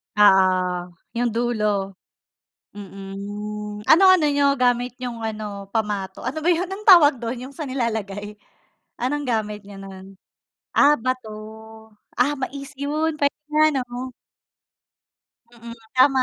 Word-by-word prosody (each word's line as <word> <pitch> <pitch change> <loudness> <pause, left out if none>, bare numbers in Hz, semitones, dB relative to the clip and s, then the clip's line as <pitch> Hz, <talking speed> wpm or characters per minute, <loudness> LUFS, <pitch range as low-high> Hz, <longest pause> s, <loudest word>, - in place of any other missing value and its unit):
Oo, 185 -3 +3 0.2
'yung 245 0 +2
dulo. 235 -2 0 1.1
Mm. 205 - -7
Hmm. 205 +2 -6
Ano 355 - +7
ano 345 -5 +4
niyo 285 -1 +3
gamit 245 -1 +1
nyong 245 -2 -5
ano 210 -2 -5
pamato? 210 -3 -2
Ano 315 +4 -3
ba 345 - +2
'yun 355 +2 -1
ang 395 +2 -7
tawag 300 -7 +8
dun 235 +2 -3
'yung 265 +2 -8
sa 315 - -4
nilalagay? 210 -5 -3 0.6
Anong 285 +4 -1
gamit 210 -2 -1
niyo 200 -1 -11
nun? 195 0 -11 0.6
Ah, 295 +1 +6
bato, 255 -1 -2 0.9
ah, 280 +4 +2
mais 275 +1 -6
'yun 305 +3 -1
pwede 285 0 +1 0.2
nga, 305 0 +5 0.2
'no? 250 +1 -6 1.4
Mm. 235 0 -10 0.2
Tama. 260 0 +4
235 Hz, 130 wpm, -22 LUFS, 205-280 Hz, 1.4 s, tawag